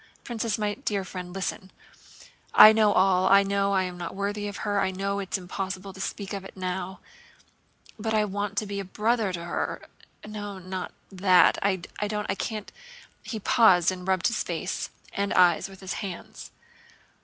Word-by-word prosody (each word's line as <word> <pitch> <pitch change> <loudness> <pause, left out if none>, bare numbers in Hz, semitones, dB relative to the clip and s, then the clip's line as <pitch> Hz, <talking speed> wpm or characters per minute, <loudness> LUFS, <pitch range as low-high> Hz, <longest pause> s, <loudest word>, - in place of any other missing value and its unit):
Princess, 230 -2 -2
my 210 -1 -1
dear 205 -6 -2
friend, 180 -1 -7
listen! 190 0 -4 0.9
I 215 - +11
know 215 -1 +4
it - - +1
all. 185 0 +4
I 200 0 +7
know 200 0 +1
I 190 -1 +3
am 180 -1 -6
not 175 +1 -5
worthy 205 +1 -2
of 205 - -6
her, 205 -1 +1
I 190 - +1
know 195 +1 -2
it's 195 0 -2
impossible 190 +1 -5
to 190 - -9
speak 200 +1 -4
of 195 -1 -4
it 195 - -12
now. 185 0 -4 1.0
But 220 +1 -1
I 215 -1 +3
want 205 0 -3
to 215 - +1
be 200 0 -4
a - - -3
brother 215 +2 0
to 170 -2 -5
her. 175 - -2 0.5
No, 205 -2 -6
not 185 0 -5 0.2
that, 185 -1 +5
I 200 -1 +2 0.3
don't, 210 0 -2
I - - 0
can't..." 210 +1 -5 0.5
He 220 - -5
paused 190 -5 +5
and 185 0 -7
rubbed 190 -2 +1
his 235 - +1
face 175 +2 -3 0.2
and 200 0 -1
eyes 175 0 +4
with 195 0 -13
his 190 0 -4
hands. 190 -4 -7
195 Hz, 185 wpm, -26 LUFS, 185-205 Hz, 1.0 s, I